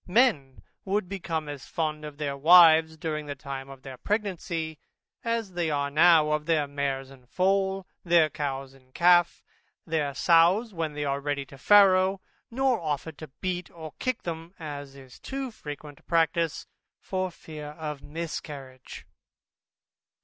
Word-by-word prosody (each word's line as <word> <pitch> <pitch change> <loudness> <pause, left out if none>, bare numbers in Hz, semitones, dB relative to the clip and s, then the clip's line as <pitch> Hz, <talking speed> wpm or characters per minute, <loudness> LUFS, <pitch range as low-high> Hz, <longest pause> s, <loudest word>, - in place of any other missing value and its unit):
Men 180 - +2 0.2
would 195 0 -1
become 165 -5 -4
as 145 -2 -7
fond 155 -2 -3
of 150 -1 -9
their 145 -2 -3
wives, 160 +1 +7
during 155 -1 -4
the 145 - -4
time 135 -1 -7
of 135 -1 -12
their 130 -2 -9
pregnancy, 170 - -3 0.4
as 230 -5 -2
they 175 -2 -1
are 140 -1 -1
now 155 0 +5
of 150 0 -1
their 155 -3 +2
mares 135 -1 -3
in 130 -2 -17
foal, 190 +3 +1 0.2
their 170 -2 +4
cows 135 -3 -4
in 130 -1 -23
calf, 175 0 +4 0.4
or 150 -4 -1
sows 180 +9 +4
when 165 -3 -3
they 145 0 -3
are 140 0 -1
ready 145 -1 -2
to 135 - -14
farrow; 190 +2 +5 0.3
nor 260 0 +1
offer 155 0 -3
to 155 0 -10
beat 180 -2 -3
or 160 -2 -10
kick 255 -2 -2
them 165 +2 -6
(as 145 -4 -7
is 130 -2 -14
too 270 -2 -5
frequent 145 -6 -9
a - - -24
practice) 165 -1 +1 0.3
for 185 -1 -2
fear 155 -3 -10
of 150 -3 -5
a - - -13
miscarriage. 145 -5 -7
160 Hz, 155 wpm, -27 LUFS, 145-180 Hz, 0.4 s, wives